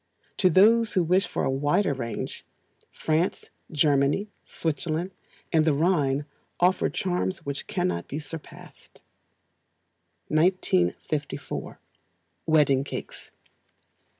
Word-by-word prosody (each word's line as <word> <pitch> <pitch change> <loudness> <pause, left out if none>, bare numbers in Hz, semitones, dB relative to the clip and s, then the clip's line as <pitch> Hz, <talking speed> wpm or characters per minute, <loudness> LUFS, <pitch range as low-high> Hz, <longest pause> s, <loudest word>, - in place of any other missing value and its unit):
To 185 - +4
those 220 +6 +5
who 185 - +3
wish 180 +3 +2
for - - -2
a - - +1
wider 145 +6 +1
range, 120 -3 -5 0.5
France, 160 +3 -1 0.2
Germany, 145 +6 +2
Switzerland, 160 +3 -2 0.4
and 160 -1 +5
the 155 -2 +2
Rhine 145 -4 +1 0.3
offer 180 +1 +3
charms 180 -1 -2
which 140 0 -3
cannot 85 -1 -1
be 140 - -5
surpassed. 155 0 -11 1.3
1954. 155 - 0 0.7
Wedding 145 -4 +4
Cakes. - - -8
155 Hz, 95 wpm, -26 LUFS, 140-180 Hz, 1.3 s, those